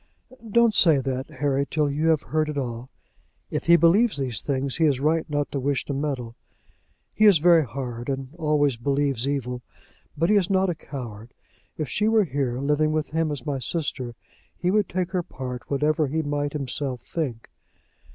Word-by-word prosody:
"Don't 235 +1 +4
say 160 -7 +6
that, 130 0 -3
Harry, 140 0 0
till 150 -1 +1
you 150 +3 0
have 160 -3 +3
heard 155 0 -1
it 150 - -4
all. 120 -2 -4 0.6
If - - -2
he 170 - +8
believes 185 +7 +4
these 125 -6 -1
things, 135 -1 -2
he 165 - +3
is 140 -4 +2
right 155 +3 +1
not 145 -1 -1
to 140 - -2
wish 135 0 -1
to 140 - -3
meddle. 135 -5 -3 0.8
He 215 - +3
is 205 -5 +8
very 165 +1 +5
hard, 125 -2 -6
and 135 0 -4
always 150 -5 +1
believes 140 0 0
evil. 125 -3 -3 0.6
But 165 +6 +2
he 210 - +5
is 190 -2 +1
not 190 -1 +2
a - - -1
coward. 120 -7 -9 0.4
If 155 - -2
she 210 - 0
were 220 -1 +4
here, 135 -7 -2
living 150 +2 +1
with 155 -1 -2
him 160 -1 0
as 140 -4 -5
my 140 -2 -2
sister, 130 -3 -2 0.4
he 180 - 0
would 210 -1 +2
take 185 0 -2
her 185 -2 0
part, 125 -6 -7
whatever 150 +2 +1
he 160 +4 -1
might 145 0 -2
himself 135 -3 -3
think." 130 -9 -4
145 Hz, 190 wpm, -24 LUFS, 130-160 Hz, 0.8 s, he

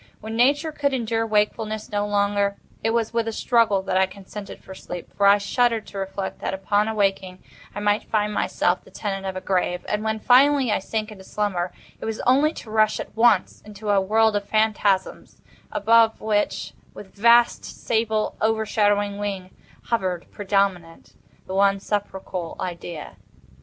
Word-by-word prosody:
When 220 +1 -6
Nature 285 +6 +2
could 285 -2 0
endure 225 -2 -1
wakefulness 215 0 -1
no 205 0 -1
longer, 200 -1 +1 0.3
it 225 - +2
was 230 0 0
with 230 -1 0
a - - -1
struggle 220 -4 +2
that 190 -1 0
I 190 0 +3
consented 200 +1 -10
to 190 - -10
sleep—for 190 +2 -2
I 200 +1 +7
shuddered 230 +2 +1
to 200 - -8
reflect 195 0 -4
that, - - -3
upon 205 +2 +1
awaking, 195 -4 -1 0.3
I 205 - -4
might 205 0 0
find 210 -1 0
myself - - 0
the - - -17
tenant 195 -2 -4
of 190 - -4
a 185 - -4
grave. 180 -2 -1
And 210 +1 -1
when, 220 0 -1
finally, 265 +1 +4
I - - +1
sank 215 +2 -4
into 195 -3 -11
slumber, 190 -3 -2 0.3
it - - -6
was 220 -1 -3
only 280 +5 +3
to 225 -8 -10
rush 215 -1 +2
at - - -7
once 225 -4 +3
into 210 0 -5
a 200 -1 +4
world 220 +2 +2
of 205 0 -3
phantasms, 215 -3 0 0.3
above 225 +1 +4
which, 210 -1 -1 0.2
with 195 - -11
vast, 235 +3 +4
sable, 220 -1 -1
overshadowing 205 -2 +1
wing, 195 -3 -4 0.3
hovered, 185 -7 -2
predominant, 195 -4 -1 0.3
the 185 - -7
one 195 0 +3
sepulchral 190 -4 -4
Idea. 170 -3 -6
205 Hz, 165 wpm, -23 LUFS, 195-220 Hz, 0.3 s, I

